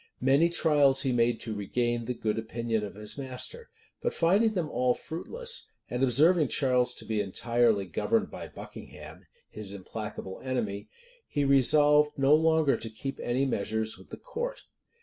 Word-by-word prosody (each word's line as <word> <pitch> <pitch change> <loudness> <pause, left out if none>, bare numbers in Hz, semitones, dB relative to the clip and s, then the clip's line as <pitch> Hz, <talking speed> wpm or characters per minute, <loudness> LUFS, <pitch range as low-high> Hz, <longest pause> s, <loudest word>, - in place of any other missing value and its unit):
Many 140 +6 +4
trials 145 -5 +3
he 135 - +1
made 120 -1 +2
to 115 - -5
regain 120 +3 -1
the 125 +1 -3
good 110 -1 -1
opinion 115 0 -2
of 100 - -7
his 105 +6 -4
master; 140 - -3 0.3
but 480 - -2
finding 205 +6 +3
them 175 -4 -1
all 125 -3 +1
fruitless, 470 - -4 0.2
and 125 +1 -2
observing 150 +5 +4
Charles 125 -2 +1
to - - -8
be 110 -2 -1
entirely 115 +1 +1
governed 210 - -1
by - - -7
Buckingham, - - -11 0.2
his 100 -2 -6
implacable 100 -1 -7
enemy, 110 -6 -3 0.4
he 145 -1 -1
resolved 150 +2 +4
no 135 +1 +4
longer 160 -2 +3
to 115 - -5
keep 135 +5 -6
any 125 +3 0
measures 110 -2 -2
with - - -16
the - - -8
court. - - -5
130 Hz, 160 wpm, -28 LUFS, 115-155 Hz, 0.4 s, Many